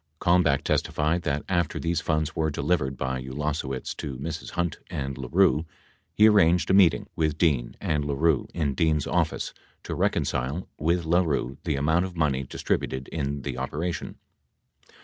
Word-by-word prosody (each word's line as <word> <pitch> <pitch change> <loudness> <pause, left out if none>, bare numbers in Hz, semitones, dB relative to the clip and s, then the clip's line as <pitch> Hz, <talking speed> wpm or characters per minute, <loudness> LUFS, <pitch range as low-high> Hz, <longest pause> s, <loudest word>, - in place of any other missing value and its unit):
55 - - -44
Kalmbach 85 -6 +3
testified 80 +3 0
that, 75 -2 -2
after 85 -4 0
these 85 -1 0
funds 80 -1 -1
were 80 -1 +1
delivered 70 -2 0
by 65 -1 -2
Ulase 75 +4 -2
wicz 65 -1 -4
to 65 -3 -5
Mrs. 80 +4 -5
Hunt 85 -2 -1
and 70 -1 -3
LaRue, 80 +4 +2 0.5
he 110 - +7
arranged 90 -5 +4
a - - +4
meeting 95 -3 +5
with 75 -2 0
Dean 70 -8 +1
and 75 -1 0
LaRue 75 +1 +1
in 75 -5 -1
Dean's 75 +1 +1
office - - -1 0.3
to - - -4
reconcile 70 +8 -1
with 85 +2 +1
LaRue 80 -6 +1
the - - 0
amount 80 +6 +2
of 90 -2 -8
money 70 -4 +1
distributed 65 0 -2
in 70 -3 -3
the 65 -3 -4
operation. 80 +6 -3
75 Hz, 160 wpm, -26 LUFS, 70-85 Hz, 0.5 s, he